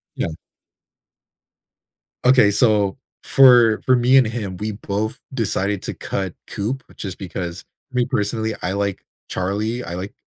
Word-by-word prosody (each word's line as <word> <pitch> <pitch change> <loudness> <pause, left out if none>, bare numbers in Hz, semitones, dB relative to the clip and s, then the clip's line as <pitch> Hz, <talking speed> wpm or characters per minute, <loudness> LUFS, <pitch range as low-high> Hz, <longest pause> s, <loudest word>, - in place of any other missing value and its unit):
Yeah. - - -1 2.0
Okay, 125 -5 +6
so, 105 0 +2 0.2
for 120 -5 +6
for 130 - +5
me 125 +2 +4
and 130 -4 +5
him, 110 -5 -4
we 105 +3 -3
both 105 +1 -3
decided 105 -5 -1
to - - -4
cut 95 -3 -4
Coop, 125 +7 -3
just 95 -3 -6
because, 90 -2 -6 0.3
me, 125 -1 +1
personally, 110 +1 -1
I 95 - -2
like 100 -1 -2 0.2
Charlie. 105 +6 -2
I 85 - -6
like 95 +4 -6
105 Hz, 135 wpm, -21 LUFS, 100-120 Hz, 2.0 s, Okay